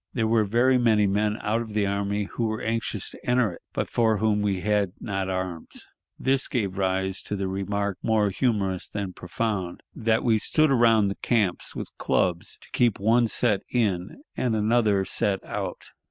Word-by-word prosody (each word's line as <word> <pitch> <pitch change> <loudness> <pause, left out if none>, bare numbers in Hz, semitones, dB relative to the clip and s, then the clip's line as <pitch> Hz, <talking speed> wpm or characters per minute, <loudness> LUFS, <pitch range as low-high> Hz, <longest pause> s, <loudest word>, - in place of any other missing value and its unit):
There 115 -3 0
were 110 -1 +3
very 125 +5 +3
many 110 -3 +4
men 105 +2 +1
out 110 +3 0
of 110 -2 -7
the 105 -2 +2
army 100 +1 -1
who 115 +3 -3
were 110 0 -2
anxious 110 -3 -3
to - - -14
enter 125 -6 +2
it, - - -13
but - - -2
for 110 -2 +2
whom 105 -1 +1
we 100 -3 0
had 105 -2 +1
not 95 -3 -3
arms. 95 -3 -5 0.3
This 135 +1 +1
gave 100 -7 -2
rise 95 0 -1
to 105 - -4
the 95 -1 -2
remark, 100 +1 -2
more 110 -3 +2
humorous 95 -5 0
than 100 -3 -4
profound, 95 0 -3
that 110 0 +1
we 110 -2 +3
"stood 155 +6 +2
around 115 -5 +4
the 100 - -4
camps 105 -7 0
with - - -7
clubs 85 -2 0
to - - -16
keep 120 -5 +2
one 115 +3 +3
set 105 -3 +1
in 105 - -1
and 120 -3 0
an 110 +1 0
other 105 -5 +3
set 95 +1 0
out." - - -5
105 Hz, 185 wpm, -25 LUFS, 95-115 Hz, 0.3 s, many